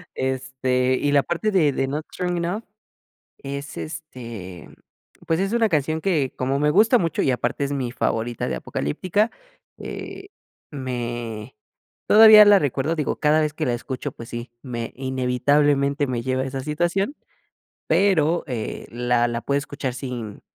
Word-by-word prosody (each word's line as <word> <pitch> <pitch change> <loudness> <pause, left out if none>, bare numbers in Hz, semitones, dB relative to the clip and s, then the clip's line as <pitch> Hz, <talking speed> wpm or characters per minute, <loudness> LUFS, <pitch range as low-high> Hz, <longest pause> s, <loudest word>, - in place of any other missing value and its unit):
Este, 130 -1 0
y 145 - +1
la 140 -1 +4
parte 195 +5 -1
de 160 -7 +3
de 135 0 -1
Not 150 +3 -3
Strong 180 -1 -2
Enough, 175 +6 -2 0.8
es 140 +1 -6
este, 115 - -8
mm, - - -17 0.5
pues, 165 +1 +1
es 195 +3 -1
una 230 -2 +3
canción 155 -1 0
que 155 -9 0
como 135 +2 -1
me 150 +1 +3
gusta 220 +7 +5
mucho 165 -7 -1
y 135 - +2
aparte 125 +3 -1
es 140 - -4
mi 130 -4 -2
favorita 120 -1 -2
de 65 - -2
Apocalyptica, 185 - -1 0.5
eh, 390 0 -8 0.4
me 120 -4 -5 0.5
todavía 215 0 +9
la 205 -1 +7
recuerdo, 145 0 -1
digo, 150 -3 -1
cada 150 +1 +3
vez 155 -1 0
que 155 - -2
la 120 - +1
escucho, 130 +2 -5
pues 115 - -10
sí, 120 0 -6
me 120 -3 -5
inevitablemente 140 +2 +1
me 125 -2 -2
lleva 130 +1 -1
a - - -3
esa 135 0 -4
situación, 175 - -1 0.7
pero, 175 -4 +3
eh, 120 -5 -5
la 120 0 +1
la 120 0 -3
puedo 140 +3 0
escuchar 140 -2 -4
sin 125 -5 -6
140 Hz, 160 wpm, -23 LUFS, 125-160 Hz, 0.8 s, todavía